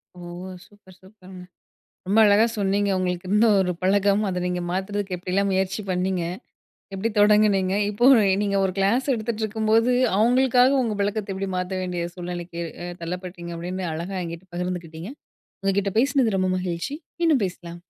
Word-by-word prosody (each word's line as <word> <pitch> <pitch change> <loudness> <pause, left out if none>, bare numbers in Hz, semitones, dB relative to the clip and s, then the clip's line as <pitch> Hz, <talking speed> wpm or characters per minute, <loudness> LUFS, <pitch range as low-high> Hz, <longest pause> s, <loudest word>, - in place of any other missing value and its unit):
ஓ! - - -13 0.5
Super 205 -3 -20
சூப்பருங்க. 190 -2 -13 0.6
ரொம்ப 205 +3 +2
அழகா 205 +2 +5
சொன்னீங்க. 200 0 +1
உங்களுக்கு 180 0 -2
இருந்த 210 +3 +4
ஒரு 180 -1 0
பழக்கம், 200 +2 +3
அத 180 - -2
நீங்க 180 0 -2
மாத்துறதுக்கு 190 +1 -3
எப்பிடிலாம் 185 +3 -1
முயற்சி 190 +2 0
பண்ணீங்க? 180 0 0 0.7
எப்பிடி 195 +4 -1
தொடங்குனீங்க? 205 -2 +4 0.2
இப்போ, 210 +4 +1 0.4
நீங்க 200 -1 0
ஒரு 185 - -2
கிளாஸ் 230 +8 +1
எடுத்துகிட்டுருக்கும்போது, 220 +1 0 0.2
அவுங்களுக்காக 255 +3 +4
உங்க 220 -3 -2
பழக்கத்த 205 -1 -2
எப்பிடி 195 0 -4
மாத்த 180 +1 -3
வேண்டிய 180 -2 -3
சூழ்நிலைக்கு 175 -1 -6 0.2
அ - - -5
தள்ளப்பட்டீங்க? 175 0 -6
அப்பிடீன்னு 180 +2 -4
அழகா 175 +4 -5
என்கிட்ட 170 +2 -8
பகிர்ந்துக்கிட்டீங்க. 175 +1 -5 0.5
உங்கக்கிட்ட 195 0 0
பேசினது 255 -5 +2
ரொம்ப 185 0 +1
மகிழ்ச்சி. 180 +9 -3 0.2
மீண்டும் 315 -8 +3
பேசலாம். 175 -1 -9
195 Hz, 140 wpm, -24 LUFS, 180-210 Hz, 0.7 s, அழகா